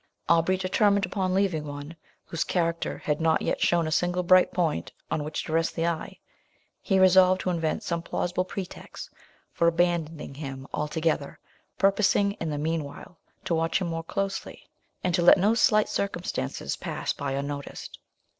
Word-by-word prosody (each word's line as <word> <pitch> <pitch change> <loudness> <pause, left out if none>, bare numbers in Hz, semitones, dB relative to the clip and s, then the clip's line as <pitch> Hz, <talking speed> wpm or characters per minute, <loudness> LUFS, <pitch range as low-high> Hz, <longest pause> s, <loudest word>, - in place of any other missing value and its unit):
Aubrey 170 +3 +3
determined 200 +2 +2
upon 185 0 -2
leaving 190 -6 +1
one, 145 +3 -7 0.3
whose 165 - -2
character 170 -2 -1
had 150 +1 -2
not 160 0 +2
yet - - -1
shown 170 -1 +3
a 155 - -3
single 175 +3 +1
bright 185 +1 +5
point 165 -4 -1 0.2
on 150 - 0
which 150 +1 -4
to 155 - -5
rest 165 0 +1
the 165 - 0
eye. 170 -2 -3 0.6
He 195 - +1
resolved 185 0 +6
to 185 - -1
invent 165 +4 -1
some 170 -3 -2
plausible 180 +1 -1
pretext 185 0 -8 0.4
for 170 - +1
abandoning 165 -3 0
him 135 -2 -7
altogether, 150 -1 -1 0.4
purposing, 200 0 +3
in 165 - -1
the 150 - -2
mean 160 +1 -1
while, 145 +4 -11 0.3
to - - 0
watch 165 +2 +1
him 180 -3 -2
more 165 0 -3
closely, 195 +3 -4 0.4
and 180 - 0
to 175 - +2
let 175 - +7
no 205 +4 +3
slight 215 -2 +4
circumstances 175 - -3
pass - - -3
by 140 -1 -3
unnoticed. 140 +1 -5
170 Hz, 165 wpm, -27 LUFS, 155-185 Hz, 0.6 s, let